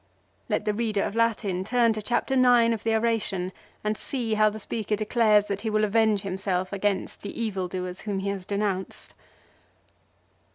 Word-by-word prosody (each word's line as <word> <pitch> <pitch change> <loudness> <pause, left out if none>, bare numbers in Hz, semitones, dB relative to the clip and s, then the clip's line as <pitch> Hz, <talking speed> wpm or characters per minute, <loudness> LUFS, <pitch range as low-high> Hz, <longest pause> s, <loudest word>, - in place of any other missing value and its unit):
Let - - 0
the 210 - +1
reader 215 -2 0
of - - -3
Latin 215 -5 +1
turn 235 +1 +3
to 215 - -4
Chapter 240 +5 0
IX 245 -3 +5
of 220 - -4
the 225 0 +2
oration 215 -5 0 0.3
and 210 0 0
see 235 -1 -3
how 215 0 +4
the 215 - -7
speaker 215 0 -2
declares 215 -1 +3
that 200 -1 -3
he 220 - -2
will 215 0 +1
avenge 215 -1 +3
himself 190 -1 -2
against 200 0 -1
the 205 - -7
evildoers 185 -4 -3
whom 205 -2 -3
he 195 +1 -2
has 195 -2 -4
denounced. 200 -2 -3
210 Hz, 170 wpm, -26 LUFS, 195-225 Hz, 0.3 s, IX